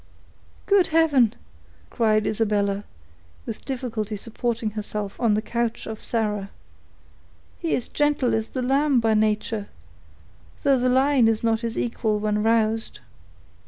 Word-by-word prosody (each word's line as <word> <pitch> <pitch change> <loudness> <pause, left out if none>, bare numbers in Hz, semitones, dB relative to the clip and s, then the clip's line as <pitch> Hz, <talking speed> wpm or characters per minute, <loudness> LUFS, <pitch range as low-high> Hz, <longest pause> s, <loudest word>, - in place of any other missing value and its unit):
"Good 395 -3 +4
heaven!" 290 -8 +3 0.6
cried 215 -3 +2
Isabella, 205 -2 0 0.6
with 225 - -6
difficulty 230 -5 -3
supporting 230 0 -3
herself 210 -1 -5
on 225 -3 +3
the 215 - -1
couch 235 0 -2
of 220 -1 -7
Sarah; 210 -4 -1 1.1
"he 335 - 0
is 245 - -3
gentle 290 -4 +1
as 220 0 0
the 255 - -4
lamb 275 +1 +3
by 225 -1 +2
nature, 215 0 0 1.0
though 275 -2 +4
the 250 +1 +2
lion 260 -1 +4
is 225 0 +1
not 225 -1 +1
his 230 -1 -3
equal 225 -3 0
when 210 0 0
roused." 225 0 +1
225 Hz, 130 wpm, -24 LUFS, 215-250 Hz, 1.1 s, Good